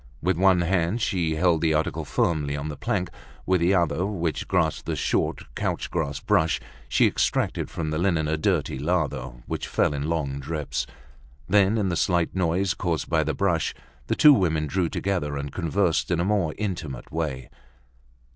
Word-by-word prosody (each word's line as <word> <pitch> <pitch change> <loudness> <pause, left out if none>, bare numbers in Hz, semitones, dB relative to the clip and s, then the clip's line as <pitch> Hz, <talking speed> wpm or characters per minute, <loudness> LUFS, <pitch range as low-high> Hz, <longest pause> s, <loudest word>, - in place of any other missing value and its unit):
With 90 +3 +1
one 95 0 +4
hand 90 +4 +1
she 85 -8 0
held 85 -1 +2
the 80 -2 +2
article 80 - -1
firmly 75 -4 0
on 75 +2 -4
the 75 - -5
plank; 90 +4 -2 0.3
with 95 -2 +2
the 90 +3 +3
other, 85 -2 +1
which 90 -5 -2
grasped - - 0
the - - -1
short - - 0
couch - - -2
grass 75 -4 -2
brush, 85 -3 +2 0.3
she 65 - +4
extracted - - 0
from 80 -2 -3
the 80 - -1
linen 85 -4 +1
a 80 - +1
dirty 75 -3 0
lather, 75 -4 0 0.2
which - - -4
fell - - +1
in 70 +2 -3
long 70 -4 -1
drips. 70 -4 -3 0.6
Then, 100 +2 +4
in 100 -3 +1
the 85 - -1
slight 85 0 +1
noise 90 +1 +1
caused 85 -3 -2
by 80 -1 +3
the 80 +1 -2
brush, 85 -5 0 0.3
the - - +1
two 150 -1 +8
women 80 - +1
drew 85 +2 0
together, 85 -7 -2
and 70 0 -4
conversed 85 -5 0
in 85 -1 +1
a 85 - +1
more 95 -6 +1
intimate 85 - -4
way. 75 -5 -3
85 Hz, 180 wpm, -25 LUFS, 75-90 Hz, 0.6 s, two